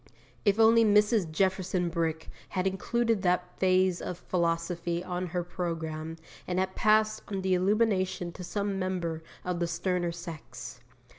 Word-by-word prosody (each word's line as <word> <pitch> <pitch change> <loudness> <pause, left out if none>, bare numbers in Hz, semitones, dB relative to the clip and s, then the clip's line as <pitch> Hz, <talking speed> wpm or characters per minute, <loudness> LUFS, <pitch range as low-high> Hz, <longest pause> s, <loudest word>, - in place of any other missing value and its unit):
If 205 +1 +3
only 225 +1 +7
Mrs. 210 -3 +4
Jefferson 185 0 +1
Brick 160 -2 -2 0.2
had 185 -1 -1
included 225 +3 +1
that 180 0 0
phase 185 -1 +3
of 180 - -4
philosophy 170 0 -1
on 180 0 -3
her 175 +1 -2
programme, 165 -2 -4 0.3
and 180 - -1
had 190 0 0
passed 215 +1 +3
on 195 -2 -3
the 190 -1 +2
illumination 185 -2 +1
to 180 - -9
some 200 +1 -2
member 175 -4 -2 0.2
of 180 -1 -1
the 170 - +1
sterner 175 0 -1
sex! 170 -2 -8
180 Hz, 145 wpm, -29 LUFS, 170-195 Hz, 0.3 s, only